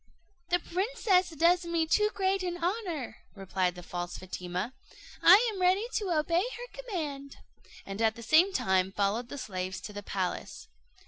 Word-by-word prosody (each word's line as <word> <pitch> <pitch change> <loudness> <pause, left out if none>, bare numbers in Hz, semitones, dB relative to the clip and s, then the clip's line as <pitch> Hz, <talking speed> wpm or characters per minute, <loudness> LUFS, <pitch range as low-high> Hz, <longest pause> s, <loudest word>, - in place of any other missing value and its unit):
"The 355 - +4
princess 375 +1 +1
does 340 +2 +3
me 335 -1 0
too 420 +6 +3
great 385 0 +1
an 355 -1 -3
honour," 345 - -3 0.2
replied 185 -2 -1
the 180 - -9
false 175 0 -5
Fatima; 185 +4 -5 0.5
"I 405 +8 +8
am 380 - -6
ready 370 +4 +3
to 410 -4 -2
obey 335 +1 +2
her - - -6
command," 290 - -5 0.5
and 195 +2 -5
at 220 -1 +3
the 235 - -9
same 320 - +5
time 190 - +1
followed 205 +5 -1
the 285 - -6
slaves 185 -5 -4
to 210 - -8
the 205 - -6
palace. 190 -2 -4
315 Hz, 165 wpm, -30 LUFS, -, 0.5 s, I